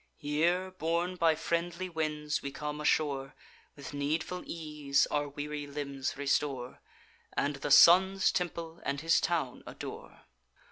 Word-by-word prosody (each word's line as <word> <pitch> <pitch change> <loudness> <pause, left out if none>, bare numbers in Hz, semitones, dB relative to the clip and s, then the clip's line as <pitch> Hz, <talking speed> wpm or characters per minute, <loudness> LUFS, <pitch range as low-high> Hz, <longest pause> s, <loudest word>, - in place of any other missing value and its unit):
Here, 170 +6 0
borne 175 +1 -1
by 165 -2 +3
friendly 170 +3 -2
winds, 150 -3 -2
we 140 - -4
come 150 +1 -5
ashore, 140 -3 0 0.4
With 140 0 -9
needful 155 +5 -2
ease 150 -4 0
our 145 -1 0
weary 145 0 -5
limbs 140 -2 -4
restore, 140 -3 -1 0.6
And 145 0 0
the 135 - -4
Sun's 190 +6 +7
temple 170 -2 -3
and 140 0 -2
his 165 +1 +3
town 160 -8 -1
adore. - - -9
150 Hz, 130 wpm, -31 LUFS, 145-170 Hz, 0.6 s, Sun's